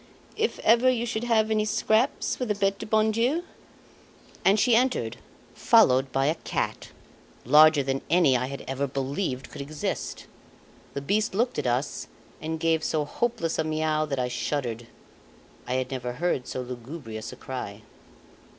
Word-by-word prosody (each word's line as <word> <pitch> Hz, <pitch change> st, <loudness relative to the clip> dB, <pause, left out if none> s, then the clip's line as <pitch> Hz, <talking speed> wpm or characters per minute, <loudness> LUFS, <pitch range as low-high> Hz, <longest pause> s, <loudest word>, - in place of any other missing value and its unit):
"If 450 Hz, +1 st, 0 dB
ever 235 Hz, +3 st, +5 dB
you 240 Hz, -2 st, 0 dB
should 225 Hz, 0 st, -3 dB
have 220 Hz, -2 st, +2 dB
any 215 Hz, -1 st, +2 dB
scraps 220 Hz, +4 st, +1 dB
for 250 Hz, -, -3 dB
the 210 Hz, -3 st, -1 dB
Bete 195 Hz, 0 st, 0 dB
du -, -, -6 dB
Bon 220 Hz, 0 st, +3 dB
Dieu 250 Hz, +10 st, +1 dB, 0.5 s
?" -, -, -26 dB
And 200 Hz, +3 st, +4 dB
she 240 Hz, +2 st, +4 dB
entered, 235 Hz, -, +1 dB, 0.4 s
followed 130 Hz, +1 st, +4 dB
by 135 Hz, +1 st, +1 dB
a 150 Hz, -, +3 dB
cat, -, -, -3 dB, 0.6 s
larger 150 Hz, +2 st, +6 dB
than 135 Hz, 0 st, -1 dB
any 165 Hz, -5 st, +4 dB
I 125 Hz, +1 st, 0 dB
had 140 Hz, +1 st, -7 dB
ever 135 Hz, +1 st, -1 dB
believed 135 Hz, +1 st, -3 dB
could 145 Hz, -, -7 dB
exist. 145 Hz, +2 st, -4 dB, 0.7 s
The 140 Hz, -, -2 dB
beast 205 Hz, +7 st, 0 dB
looked 240 Hz, -4 st, 0 dB
at 140 Hz, -, -1 dB
us 125 Hz, +4 st, -1 dB, 0.3 s
and 160 Hz, 0 st, -3 dB
gave 160 Hz, -1 st, +1 dB
so 150 Hz, -2 st, 0 dB
hopeless 220 Hz, -2 st, -2 dB
a -, -, +3 dB
miau 155 Hz, 0 st, 0 dB
that 140 Hz, -2 st, -2 dB
I 125 Hz, -1 st, 0 dB
shuddered. 120 Hz, -2 st, -3 dB, 0.8 s
I 125 Hz, -, -1 dB
had 130 Hz, 0 st, -2 dB
never 125 Hz, -2 st, -3 dB
heard 135 Hz, -3 st, -1 dB
so 130 Hz, -, -4 dB
lugubrious 120 Hz, -2 st, -7 dB
a -, -, -9 dB
cry. 110 Hz, -5 st, -7 dB
155 Hz, 170 wpm, -26 LUFS, 130-215 Hz, 0.8 s, larger